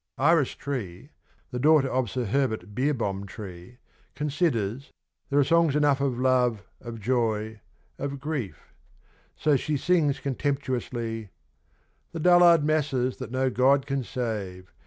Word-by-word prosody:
Iris 150 +1 +3
Tree 125 - -6 0.4
(the 125 - -3
daughter 150 0 +4
of 130 -3 -1
Sir 125 +2 -2
Herbert 110 -5 -1
Beerhohm 110 -7 -1
Tree) 95 +2 -10 0.4
considers 140 - -1 0.2
' - - -49
there 140 - 0
are 145 - +6
songs 165 0 +3
enough 145 -2 +3
of 135 -3 0
love, 125 -4 +2 0.2
of 115 -1 -8
joy, 110 -2 -1 0.4
of 140 0 -4
grief,' 135 - -5 0.6
so 150 -2 +2
she 145 +3 -1
sings 150 -3 +1
contemptuously: 125 -5 -3 0.8
The 165 - -4
dullard 175 -1 +6
masses 140 -5 0
that - - -7
no 130 +1 0
God 135 +2 +3
can 135 -1 -2
save 100 -7 -5
130 Hz, 135 wpm, -26 LUFS, 115-145 Hz, 0.8 s, are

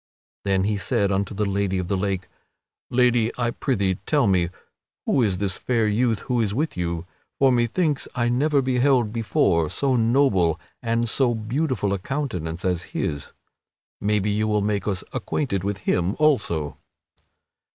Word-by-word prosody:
Then 95 -1 +2
he 105 +1 0
said 100 -1 0
unto 100 +1 -1
the 105 +1 0
Lady 100 -1 0
of 90 -1 -2
the 100 - 0
Lake: 95 -1 -2 0.6
"Lady, 120 -2 +3
I 120 -1 0
prithee 100 -9 0
tell 145 -4 +3
me, 90 -4 +2 0.6
who 135 - +2
is 100 -5 +1
this 95 -2 -1
fair 115 -3 +1
youth 110 0 +1
who 125 -3 0
is 105 -2 0
with 155 +5 -1
you. 85 -1 -2 0.3
For 135 -1 +4
methinks 135 +6 +1
I 120 -2 +1
never 140 +3 +2
beheld 125 -3 +2
before 90 -8 +1
so 135 - 0
noble 110 - +3 0.2
and 115 0 0
so 120 +1 +2
beautiful 110 -2 -1
a 100 - -1
countenance 90 - -3
as 90 -2 +1 0.2
his. 70 -3 -2 0.7
Maybe 105 0 +1
you 110 +1 0
will 105 -1 +1
make 105 0 -1
us 95 -3 -1
acquainted 100 -11 -2
with 100 0 -1
him 90 +3 +1
also." 85 - +1
105 Hz, 160 wpm, -24 LUFS, 95-125 Hz, 0.7 s, For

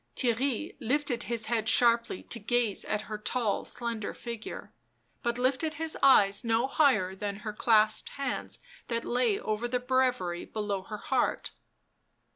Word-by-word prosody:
Theirry 255 +4 0
lifted 255 -1 -1
his 230 -2 +1
head 225 0 0
sharply 235 -5 +4
to 235 - -6
gaze 230 -1 0
at 210 - -1
her 215 -1 -6
tall 220 -1 -1
slender 230 -3 -4
figure; 235 -2 -7 0.5
but 235 -1 -1
lifted 270 +5 0
his 320 +1 -2
eyes 205 -7 +5
no 230 +1 +2
higher 255 -10 +2
than 200 +1 -5
her 215 - -3
clasped 215 0 +3
hands 275 0 -3 0.3
that 230 -1 -2
lay 240 -4 +1
over 215 +2 -2
the 250 +1 -1
breviary 250 -9 0
below 205 -3 -3
her 210 +3 -7
heart. 260 +4 -1
235 Hz, 145 wpm, -29 LUFS, 215-255 Hz, 0.5 s, eyes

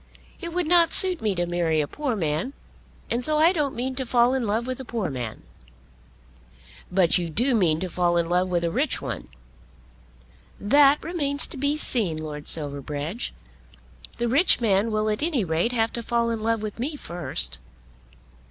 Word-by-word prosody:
It 340 -2 -6
would 355 0 -1
not 335 0 +4
suit 370 -2 +5
me 210 -3 0
to 175 0 0
marry 170 -2 0
a 150 - 0
poor 280 - -3
man, 165 - -2 0.6
and 240 +2 0
so 305 +2 +2
I 325 +4 +5
don't 295 -6 -1
mean 255 +2 -2
to 265 - 0
fall 240 +1 +3
in 255 -4 -1
love 220 +3 0
with 255 0 -4
a - - -5
poor 230 - -3
man." 120 -4 -5 1.5
"But 180 -1 +4
you 170 -1 -3
do 245 - +1
mean 170 -8 +2
to 185 - -1
fall 175 0 +1
in 170 -1 +1
love 180 +2 +1
with 175 -1 0
a 170 - 0
rich - - 0
one?" - - -5 1.3
"That 280 +7 +4
remains 290 -4 -1
to - - -5
be 285 +2 0
seen, 215 - 0
Lord 150 -2 -7
Silverbridge. 145 - -4 0.9
The 240 - -1
rich 285 +10 +3
man 210 -1 +2
will 215 0 0
at 210 0 -1
any 300 -8 +1
rate 170 +6 0
have 225 -2 +1
to 235 - -3
fall 235 0 0
in 225 -1 -3
love 225 0 0
with 215 +1 -6
me 290 +6 -2
first. 170 - -3
225 Hz, 185 wpm, -24 LUFS, 175-270 Hz, 1.5 s, suit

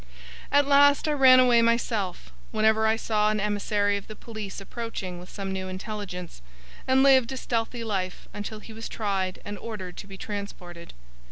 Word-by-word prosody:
At 285 0 +5
last 285 +1 +5
I - - +2
ran 260 -3 +7
away 245 -2 +5
myself, 225 - 0 0.2
whenever 220 0 +3
I 220 - +3
saw 215 -2 +1
an 215 0 0
emissary 205 0 +1
of 200 - -9
the 215 - -8
police 215 -3 -7
approaching 195 -4 -6
with 180 - -12
some 195 -2 -5
new 190 0 -4
intelligence; 185 - -6 0.5
and 260 +1 +4
lived 265 -3 +5
a - - -5
stealthy 235 -1 -2
life 190 -5 -3
until 210 +1 -6
he 225 - -11
was 225 +1 -7
tried 195 -4 -2
and 205 0 -6
ordered 190 -6 -7
to - - -8
be 195 -1 -10
transported. 185 -5 -7
210 Hz, 175 wpm, -26 LUFS, 195-230 Hz, 0.5 s, ran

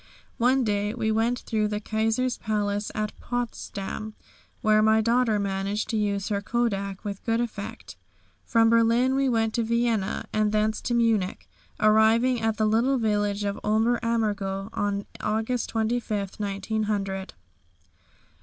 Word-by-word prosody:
One 255 +2 +3
day 205 0 0
we 220 -2 0
went 225 +3 +1
through 215 -2 0
the 210 0 -2
Kaiser's 225 +4 0
Palace 205 -1 -1
at 215 -1 -2
Potsdam, 215 -3 -4 0.5
where 215 0 +4
my 220 +1 +4
daughter 230 0 +2
managed 200 +1 -2
to - - -1
use 200 -1 -1
her 200 -1 -1
kodak 200 -4 -2
with 200 -1 -5
good 230 -1 +1
effect. 225 -1 -5 0.5
From 225 -1 +3
Berlin 230 +3 +4
we 270 0 +2
went 225 -2 +1
to 235 - 0
Vienna, 230 -3 0
and 215 -1 +2
thence 215 0 +1
to 240 - -1
Munich, 225 - +1 0.3
arriving 220 +3 +4
at 225 -1 0
the 215 - +2
little 235 +5 +2
village 205 -2 0
of 200 0 -2
Ober 220 +3 +2
Ammergau 205 -4 -1
on 200 -1 -1 0.2
August 220 +3 -1
25, 220 -3 -1
1900. 205 0 -1
Dr. 190 - -9
220 Hz, 145 wpm, -26 LUFS, 205-230 Hz, 0.5 s, where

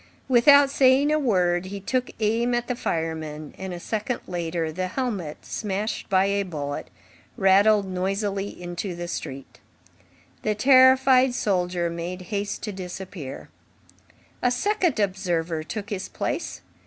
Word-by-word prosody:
Without 275 +3 +6
saying 270 +2 +4
a 305 - +3
word, 180 -9 +1
he 200 +1 -6
took 250 +5 -1
aim 230 +3 +1
at 240 0 -2
the 250 - -1
fireman, 160 -5 -3
and, 190 -1 -6
a 175 - -5
second 220 +6 -3
later, 170 -2 -2
the 185 +3 -2
helmet, 195 - -4
smashed 210 +1 -3
by 190 0 +4
a 200 0 +1
bullet, 145 -7 -4 0.5
rattled 200 +1 +5
noisily 195 +2 -2
into 175 0 -6
the 175 0 -5
street. 135 -5 -7 0.8
The 215 -1 0
terrified 260 +1 +6
soldier 180 -5 0
made 175 +2 -5
haste 205 0 -2
to 210 - -3
disappear. 185 -5 -7 0.9
A 245 - +3
second 345 - +1
observer 175 -5 -1
took 205 +6 -6
his 195 -2 -4
place. - - -3
195 Hz, 135 wpm, -25 LUFS, 175-240 Hz, 0.9 s, Without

